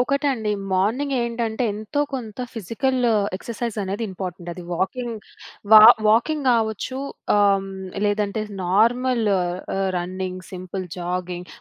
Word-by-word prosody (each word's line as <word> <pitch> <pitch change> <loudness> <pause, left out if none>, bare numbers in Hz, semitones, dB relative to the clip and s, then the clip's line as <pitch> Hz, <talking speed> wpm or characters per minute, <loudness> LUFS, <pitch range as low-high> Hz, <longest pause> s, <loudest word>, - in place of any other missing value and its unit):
ఒకటండి 265 -4 0 0.2
మార్నింగ్ 225 +10 +1
ఏంటంటే, 235 0 -2
ఎంతో 215 +8 -3
కొంత 230 -5 -5
ఫిజికల్ 245 +5 -1 0.4
ఎక్సర్సైజ్ 235 +1 -5
అనేది 195 +3 -3
ఇంపార్టెంట్. 180 -2 -6
అది 180 +1 -9
వాకింగ్ 220 +6 -2 0.5
వా 215 - +12 0.3
వాకింగ్ 270 +8 +2
కావచ్చు 225 +2 0 0.4
ఆహ్, 205 - +4 0.2
హ్మ్, - - -8 0.4
లేదంటే 205 0 0 0.2
నార్మల్ 235 +6 +2 0.2
ఆహ్, 175 0 -2 0.4
రన్నింగ్, 185 +1 -4
సింపుల్ 185 +1 -5
జాగింగ్ 180 0 -4
215 Hz, 115 wpm, -23 LUFS, 185-240 Hz, 0.5 s, వా